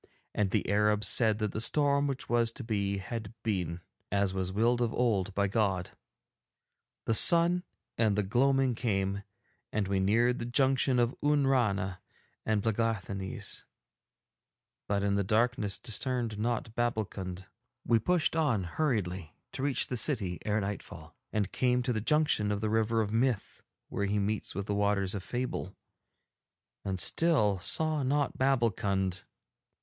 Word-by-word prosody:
And 105 -2 +1
the - - 0
Arabs 105 +1 +2
said 110 -3 +3
that 105 -2 -2
the 110 - -4
storm 140 +2 +2
which 135 -2 -4
was 120 -1 +2
to 130 - -7
be 100 -3 -1
had 110 +3 -6
been, 90 -5 -2 0.3
as 100 -1 +1
was 95 -1 -2
willed 120 +5 +2
of 120 -2 +1
old 105 -6 0
by 100 0 +2
God. 95 -3 0 1.1
The 115 - +1
sun 170 +7 +7
set 150 -8 -7
and 105 -2 +2
the 105 - +1
gloaming 135 +5 +2
came, 100 -4 -1 0.5
and 105 -2 -1
we 100 0 0
neared 115 +6 +2
the 120 - -4
junction 130 0 +2
of 120 0 +2
Oonrana 120 -11 +1 0.5
and 110 -2 +1
Plegáthanees, 105 -4 -2 1.2
but 100 -1 0
in 100 0 +1
the 100 0 +1
darkness 110 0 0
discerned 120 -2 -3
not 115 0 -2
Babbulkund. 100 -6 -3 0.4
We 115 -1 +3
pushed 175 +4 +1
on 140 - +1
hurriedly 95 - -2 0.2
to - - -6
reach 140 -1 0
the 125 - -4
city 100 - 0
ere 105 0 0
nightfall, 100 +1 -7 0.2
and 100 -3 -1
came 125 -1 +1
to 125 - 0
the 110 - -2
junction 150 -6 +2
of 100 - -1
the 110 0 -1
River 110 +1 +2
of 105 0 -3
Myth 120 -2 0 0.3
where 100 - -2
he 100 +1 0
meets 105 -1 -2
with 100 +1 -3
the 105 - -2
Waters 100 -1 +1
of 100 - -3
Fable, 120 -3 -4 1.1
and 95 -1 -3
still 105 - +2
saw 155 - 0
not 140 +2 0
Babbulkund. 100 -8 +1
110 Hz, 155 wpm, -30 LUFS, 100-125 Hz, 1.2 s, sun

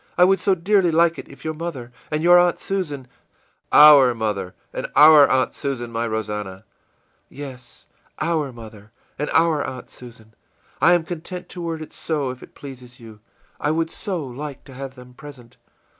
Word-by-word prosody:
I 180 - +6
would 190 +1 +4
so 190 +1 +2
dearly 185 +1 +2
like 165 +1 +2
it - - -10
if - - -14
your 155 - -2
mother 150 -7 -7 0.2
and 155 +1 -2
your 175 +1 +7
Aunt 175 0 +2
Susan 150 -9 -4 0.6
î - - +4
ìOur 140 -5 +8
mother 100 -4 -3 0.2
and - - -4
our 150 -1 +8
Aunt 130 -1 +1
Susan, 130 -4 -4
my 115 0 -2
Rosannah.î 105 -3 -5 0.7
ìYes, 130 -3 -10 0.3
our 155 -3 -1
mother 110 -3 -13 0.3
and 150 - -2
our 160 -3 +2
Aunt 130 -1 -8
Susan 115 -3 -14 0.5
I 175 - +6
am 175 -2 +2
content 175 +2 -7
to 180 - -8
word 165 -2 -4
it - - -14
so 145 -5 -3
if 130 - -11
it - - -15
pleases 125 -3 -12
you; 110 -3 -13 0.4
I 145 - -1
would 165 +1 -1
so 185 -8 -4
like 135 +2 -8
to 135 - -14
have 135 0 -8
them 125 -1 -14
present. 125 -4 -13
140 Hz, 180 wpm, -21 LUFS, 120-165 Hz, 0.7 s, ìOur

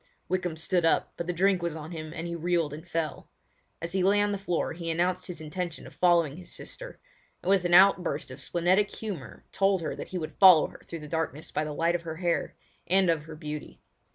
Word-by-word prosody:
Wykham 180 -3 -1
stood 170 +3 +1
up, 165 - +2
but 170 - -5
the - - +1
drink 185 +1 +2
was 170 -2 -2
on 155 +1 -7
him 155 -2 -6
and 165 0 -5
he 170 - -4
reeled 170 -3 0
and 160 +3 -9
fell. 165 -3 -3 0.5
As 170 +1 -4
he 190 +1 +1
lay 200 +3 +4
on 205 0 +2
the 200 - -2
floor 180 -3 -1
he 170 0 -5
announced 180 +2 0
his 180 -3 -7
intention 165 +2 -5
of - - -12
following 170 -4 +3
his 180 - -9
sister; - - -8 0.4
and 185 - +1
with 190 -2 +3
an 175 0 +4
outburst 180 -7 +4
of 130 - -9
splenetic 185 +4 +2
humour 185 - -7
told 195 -2 +2
her 155 - -3
that - - -7
he 185 - -4
would 155 -3 -6
follow 185 -5 +9
her - - -14
through 165 -2 -6
the 150 - -8
darkness 160 -1 -3
by 155 - 0
the 155 - -4
light 165 +3 +1
of 175 - -1
her 160 -1 -6
hair, 170 0 -1 0.3
and 190 -1 +4
of 155 -2 -2
her 160 -1 -9
beauty. 150 -1 -7
170 Hz, 235 wpm, -28 LUFS, 160-185 Hz, 0.5 s, follow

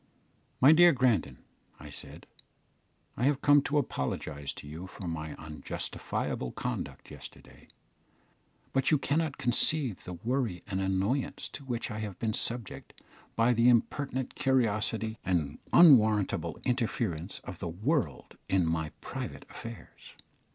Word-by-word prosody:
"My 135 +4 +8
dear 175 +2 +7
Grandon," 125 - +1 0.4
I - - -10
said, - - -11 0.9
"I 125 - 0
have 140 0 +2
come 145 0 +6
to 145 +1 -1
apologise 70 - -2
to - - -11
you 80 +5 -7
for 95 0 -8
my 80 -2 -4
unjustifiable 75 -4 -4
conduct - - -5
yesterday, - - -13 1.1
but 135 0 +2
you 155 - +5
cannot 145 +1 -1
conceive 125 - +2
the 90 - -6
worry 110 -1 -2
and 95 -2 -3
annoyance 95 +8 -1
to - - -9
which 120 -2 -3
I 105 - -4
have 105 -3 -5
been 110 -2 -1
subject 115 -2 -3 0.4
by 115 +2 +3
the 115 +1 +4
impertinent 130 +2 0
curiosity 110 -3 0
and 85 -6 -1
unwarrantable 110 - +5
interference 110 - -1
of 90 - -8
the 85 - -4
world 105 - -2
in 95 -2 +3
my 80 -1 -1
private - - -6
affairs. 115 -1 -10
110 Hz, 130 wpm, -30 LUFS, 90-130 Hz, 1.1 s, My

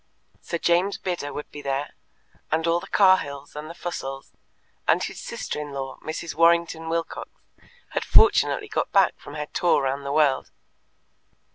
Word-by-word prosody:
Sir 170 - -3
James 175 +4 +2
Bidder 175 -6 -3
would 150 - -7
be 145 - -8
there, 140 +1 -2 0.6
and 160 +1 +1
all 170 +1 +2
the - - -10
Cahills 150 -9 +2
and 150 +1 -6
the 170 - -8
Fussells, 135 -7 -6 0.5
and - - +4
his - - -5
sister - - -5
in 145 -1 -7
law, 135 -1 -5
Mrs. 160 +1 -4
Warrington 165 0 +3
Wilcox, 165 0 -3 0.6
had - - -2
fortunately 425 0 +4
got 435 - -2
back - - +4
from 145 - -10
her 150 0 -3
tour 175 -5 +3
round 135 +1 -1
the 140 - -3
world. 145 -2 +2
160 Hz, 160 wpm, -25 LUFS, 140-170 Hz, 0.6 s, and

